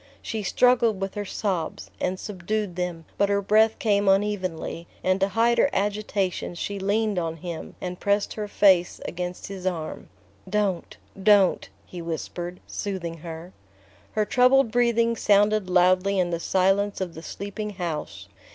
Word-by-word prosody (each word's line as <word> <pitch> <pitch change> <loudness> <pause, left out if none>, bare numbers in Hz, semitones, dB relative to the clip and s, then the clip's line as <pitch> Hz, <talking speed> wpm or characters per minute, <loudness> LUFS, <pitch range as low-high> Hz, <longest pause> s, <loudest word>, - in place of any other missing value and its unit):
She 220 - -3
struggled 235 0 +3
with 195 0 -3
her 205 -1 -4
sobs, 185 -5 -3
and 185 +1 -1
subdued 205 0 -3
them; 175 -2 -3
but 200 0 +3
her 200 0 +2
breath 215 +2 +3
came 205 -2 +2
unevenly, 190 -4 -1 0.2
and 185 +1 +2
to 195 - +3
hide 230 +4 +2
her - - +4
agitation 200 -3 -1
she 200 +4 -4
leaned 205 0 +1
on 165 -1 -3
him 170 0 -7
and 180 -1 -5
pressed 200 0 +1
her 210 -1 -4
face 190 -4 +3
against 180 0 -5
his 190 -1 -5
arm. 165 -4 -4 0.4
"Don't 200 -3 -1 0.2
don't," 200 -2 +4 0.2
he 175 - -8
whispered, 175 +2 -5
soothing 180 -5 -4
her. 165 +2 -9 0.6
Her 215 -1 +1
troubled 250 +1 +4
breathing 235 -1 +2
sounded 205 -2 +3
loudly 185 +2 +3
in 180 -2 +1
the 170 - -1
silence 195 +3 +1
of 185 -3 -3
the 160 - -9
sleeping 205 +4 -5
house. 150 - -4
195 Hz, 150 wpm, -25 LUFS, 180-210 Hz, 0.6 s, her